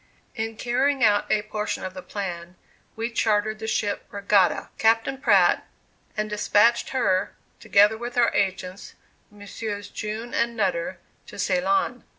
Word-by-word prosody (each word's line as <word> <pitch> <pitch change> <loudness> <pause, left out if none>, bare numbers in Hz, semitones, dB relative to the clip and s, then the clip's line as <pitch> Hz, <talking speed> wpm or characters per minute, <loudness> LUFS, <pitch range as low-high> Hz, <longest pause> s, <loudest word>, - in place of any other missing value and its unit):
In 225 -2 -4
carrying 260 +3 +1
out 205 -2 +3
a 210 -1 +2
portion 215 0 -4
of 185 - -6
the 185 - -8
plan, 180 -2 -6 0.4
we 230 +1 -3
chartered 215 -1 +1
the 220 - -5
ship 205 -2 -1
"Regatta," 200 -2 +2
Captain 225 +4 +2
Pratt, - - +4 0.5
and 215 0 0
despatched 210 +2 +2
her, 195 -8 0 0.2
together 210 +2 +4
with 240 +1 -6
our 240 -1 +4
agents, 190 -1 -2 0.3
Messrs. 205 0 -7
June 220 +3 -5
and 235 0 0
Nutter, 185 -3 -1 0.3
to - - -11
Ceylon. 195 +5 0
210 Hz, 140 wpm, -24 LUFS, 195-230 Hz, 0.5 s, Pratt